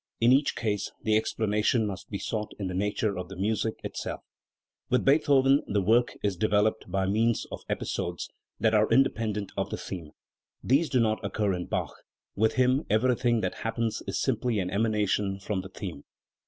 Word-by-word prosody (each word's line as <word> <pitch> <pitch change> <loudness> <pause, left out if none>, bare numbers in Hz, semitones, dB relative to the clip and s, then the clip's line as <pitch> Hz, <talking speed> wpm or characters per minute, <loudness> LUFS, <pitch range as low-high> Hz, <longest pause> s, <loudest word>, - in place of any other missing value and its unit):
In 115 +2 +5
each 140 +2 +3
case 105 -3 -2
the 110 -1 +2
explanation 110 +1 +1
must 95 -3 -6
be 100 - -3
sought 105 +1 -4
in 100 - -4
the 90 - -3
nature 105 +2 0
of 90 0 -5
the 95 - -8
music 110 +3 -1
it - - -6
self. - - -4 0.7
With 125 - +2
Beethoven 140 -1 +4
the 105 - +1
work 115 +5 +3
is 100 -2 +1
developed 105 +2 +1
by 95 +1 0
means 110 +4 +1
of - - -6
"episodes" - - -3 0.3
that 110 -1 +2
are 105 0 +4
independent 110 -6 +1
of - - -2
the - - -3
theme. 85 -5 -7 0.5
These 145 +5 +3
do 130 -2 +2
not 110 -2 +1
occur 105 -3 0
in 90 -1 -4
Bach; - - -2 0.4
with 110 +2 +2
him 130 +2 +3
everything 120 +1 +2
that 90 - -1
"happens" 115 0 -1
is - - -1
simply 120 -2 0
an 90 -2 -1
emanation 105 -2 0
from 100 -1 -2
the 95 - -10
theme. 95 -6 -7
110 Hz, 180 wpm, -28 LUFS, 100-115 Hz, 0.7 s, In